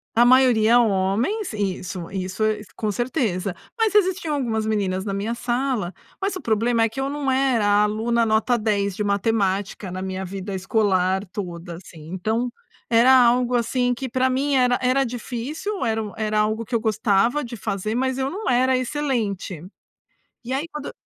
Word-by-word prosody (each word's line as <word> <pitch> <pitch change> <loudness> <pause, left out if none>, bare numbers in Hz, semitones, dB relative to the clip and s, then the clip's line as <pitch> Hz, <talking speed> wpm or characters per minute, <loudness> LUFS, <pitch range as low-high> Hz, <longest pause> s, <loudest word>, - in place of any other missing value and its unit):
A 235 +1 +6
maioria 245 -2 +5
homens, 220 - 0
isso, 185 -3 -3
isso 190 +2 -3
é 215 -1 +1
com 215 -1 -1
certeza. 205 - -1 0.2
Mas 445 -2 +2
existiam 375 -5 +2
algumas 225 -5 -1
meninas 195 -3 -1
na 200 - -2
minha 210 +4 -2
sala, 240 -6 -1 0.3
mas 395 0 -1
o 370 - -6
problema 230 +1 +1
é 225 - +2
que 225 - -7
eu 270 +1 -1
não 285 -2 -1
era 260 -4 +2
a 205 0 +4
aluna 230 +3 +1
nota 220 +3 +2
dez 200 -3 0
de 210 - -2
matemática 200 -1 0
na 185 +1 -5
minha 190 0 -4
vida 195 +1 -5
escolar 190 -1 +1
toda, 175 -3 -6
assim. 165 -3 -12
Então 220 +6 -1 0.4
era 235 +3 +6
algo, 250 0 +4
assim, 245 +1 +1
que 260 +2 -5
para 260 +2 +1
mim 275 +2 0
era 250 -1 +3
era 255 +2 +2
difícil, 255 - -4
era 225 0 0
u 210 - -7
era 215 -1 0
algo 215 +2 0
que 255 - -11
eu 230 - +3
gostava 220 +5 +1
de 240 0 -7
fazer, 200 +2 -3
mas 260 +1 0
eu 270 0 -1
não 410 +7 -4
era 255 +1 +3
excelente. 235 - -2 0.8
E 245 - -5
aí 285 +5 -2
quando 300 -2 -7
225 Hz, 175 wpm, -23 LUFS, 200-255 Hz, 0.8 s, A